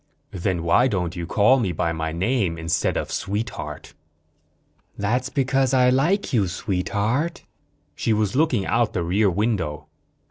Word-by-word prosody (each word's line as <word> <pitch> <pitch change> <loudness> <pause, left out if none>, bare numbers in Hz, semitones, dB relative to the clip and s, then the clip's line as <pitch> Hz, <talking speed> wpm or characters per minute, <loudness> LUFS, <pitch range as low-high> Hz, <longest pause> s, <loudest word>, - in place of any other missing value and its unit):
"Then 90 -2 -2
why 85 +10 +4
don't 90 -7 -2
you 85 -1 -5
call 120 +8 +4
me 100 -7 0
by 85 0 -1
my 80 0 -3
name, 95 0 0
instead 80 +1 0
of - - -3
'Sweetheart'?" 105 +4 -4 1.0
"That's 125 +6 -1
because 135 -1 +1
I 125 -1 +5
like 160 +8 +1
you, 105 -6 +2
Sweetheart." 105 - -2 0.5
She - - -1
was 105 -1 +1
looking 135 -9 +2
out 115 0 +1
the 90 - -1
rear 100 +5 +2
window. 90 -7 -2
105 Hz, 145 wpm, -23 LUFS, 90-125 Hz, 1.0 s, I